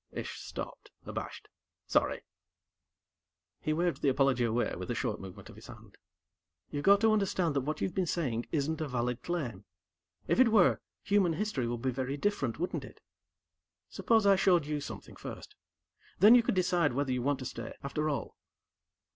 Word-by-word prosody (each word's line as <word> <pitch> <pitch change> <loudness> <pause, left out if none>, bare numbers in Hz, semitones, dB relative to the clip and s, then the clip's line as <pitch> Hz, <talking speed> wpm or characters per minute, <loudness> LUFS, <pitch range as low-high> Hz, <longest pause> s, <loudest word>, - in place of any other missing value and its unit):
Ish - - -6
stopped, - - -7 0.2
abashed. - - -6 0.4
"Sorry." - - +1 1.4
He 155 - -2
waved 170 +2 0
the 140 - +3
apology 135 -2 +2
away 115 +1 0
with 90 +1 -7
a 120 - -1
short 115 -3 -2
movement 95 -1 -10
of - - -12
his - - -13
hand. - - -13 0.8
"You've 145 0 -3
got 200 +1 +6
to 220 -1 +5
understand 190 -6 +1
that 140 - +2
what 150 +4 -3
you've 185 - -1
been 185 -3 0
saying 125 -10 -1
isn't 155 +1 -1
a 155 - -1
valid 125 -1 -2
claim. 130 - -3 0.6
If - - +2
it 260 - +7
were, 215 -5 +4 0.2
human 200 -4 +3
history 160 - -2
would 120 0 -4
be 130 - +1
very 130 +2 -3
different, 145 - -1
wouldn't 175 - -2
it?" - - -12 0.9
"Suppose 225 -3 +2
I 200 -1 +6
showed 175 -5 +3
you 150 0 -2
something, - - -8
first? - - -9 0.6
Then, 210 +6 +8
you 245 - +8
could 230 - -1
decide 175 -6 +2
whether 140 0 -1
you 125 -1 0
want 140 +2 +1
to 130 - -7
stay, 130 - -6
after 150 +2 -1
all." 145 - -3
150 Hz, 180 wpm, -31 LUFS, 130-185 Hz, 1.4 s, Then